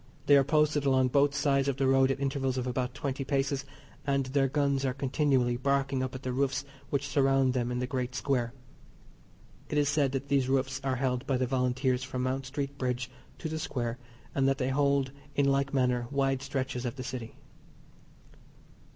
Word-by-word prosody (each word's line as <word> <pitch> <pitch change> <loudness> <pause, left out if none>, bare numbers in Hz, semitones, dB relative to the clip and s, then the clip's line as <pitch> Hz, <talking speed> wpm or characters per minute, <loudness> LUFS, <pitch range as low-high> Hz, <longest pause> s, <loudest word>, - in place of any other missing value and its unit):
They 145 - +6
are 140 - +6
posted 150 +1 +2
along 130 -2 +3
both 140 +2 +3
sides 140 -1 +2
of 135 -2 0
the 135 - +1
road 135 0 +4
at 135 - -1
intervals 135 -2 -1
of 125 - -1
about 125 0 -2
twenty 135 -1 -3
paces, 140 0 -1 0.4
and 140 -1 +1
their 135 +1 +2
guns 140 -1 +1
are 130 -2 0
continually 130 -3 +1
barking 135 0 0
up 130 0 -3
at 130 - -7
the 125 - -2
roofs 135 +1 0 0.2
which 140 0 -1
surround 135 -2 +3
them 125 -1 -1
in 125 - -1
the 125 - -1
great 125 -1 -3
square. 125 -4 0 1.2
It 150 - -1
is 145 -1 +3
said 145 -2 +2
that 135 +1 -3
these 135 -2 +2
roofs 135 0 0
are 135 -1 0
held 130 0 -1
by 135 - +2
the 130 - +1
Volunteers 125 0 0
from 130 -1 -3
Mount 130 +1 -2
Street 140 0 -4
Bridge 125 -1 -2 0.3
to - - -4
the 160 0 -3
Square, 120 -5 -3 0.3
and 135 -1 +2
that 135 0 +2
they 130 -1 0
hold 140 -1 +2 0.2
in 140 - +3
like 140 0 +2
manner 125 -3 +1
wide 135 -1 +1
stretches 135 -2 -3
of 120 0 -3
the 130 - -6
City. 125 -3 -6
135 Hz, 195 wpm, -29 LUFS, 130-140 Hz, 1.2 s, They